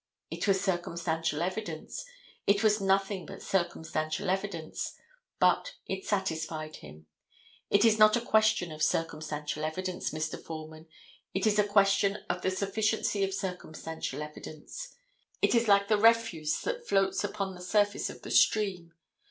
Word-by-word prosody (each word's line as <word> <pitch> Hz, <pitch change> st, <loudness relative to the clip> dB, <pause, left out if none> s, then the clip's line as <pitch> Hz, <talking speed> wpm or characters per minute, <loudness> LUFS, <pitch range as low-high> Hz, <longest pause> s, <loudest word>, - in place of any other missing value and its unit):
It -, -, -3 dB
was 195 Hz, -1 st, +4 dB
circumstantial 170 Hz, -4 st, -1 dB
evidence; 180 Hz, -3 st, -4 dB, 0.4 s
it 200 Hz, +2 st, +4 dB
was 210 Hz, -1 st, +4 dB
nothing 195 Hz, 0 st, +1 dB
but -, -, -9 dB
circumstantial 165 Hz, 0 st, -1 dB
evidence, 190 Hz, -5 st, -3 dB, 0.4 s
but -, -, +2 dB
it 190 Hz, 0 st, -4 dB
satisfied 160 Hz, -5 st, -2 dB
him. 75 Hz, +1 st, -13 dB, 0.6 s
It 200 Hz, +2 st, +4 dB
is 220 Hz, -1 st, +4 dB
not 215 Hz, 0 st, +7 dB
a -, -, -2 dB
question 215 Hz, -6 st, +3 dB
of 155 Hz, 0 st, -8 dB
circumstantial 155 Hz, -2 st, -1 dB
evidence, 180 Hz, +3 st, -2 dB
Mr. 155 Hz, 0 st, -4 dB
Foreman; 155 Hz, 0 st, -8 dB, 0.5 s
it 190 Hz, -, +1 dB
is 210 Hz, -1 st, +3 dB
a -, -, +6 dB
question 200 Hz, 0 st, +3 dB
of -, -, -4 dB
the -, -, +1 dB
sufficiency 200 Hz, +2 st, 0 dB
of 195 Hz, -, 0 dB
circumstantial 160 Hz, -6 st, -4 dB
evidence. 155 Hz, -, -9 dB, 0.4 s
It -, -, +3 dB
is 235 Hz, -1 st, +3 dB
like 200 Hz, -1 st, +5 dB
the 215 Hz, -1 st, +3 dB
refuse 220 Hz, -9 st, +3 dB
that -, -, -3 dB
floats 195 Hz, 0 st, +2 dB
upon 195 Hz, -1 st, -3 dB
the 180 Hz, -, -11 dB
surface 205 Hz, +2 st, +1 dB
of -, -, -10 dB
the -, -, -7 dB
stream. 185 Hz, -6 st, +2 dB
190 Hz, 145 wpm, -30 LUFS, 160-205 Hz, 0.6 s, not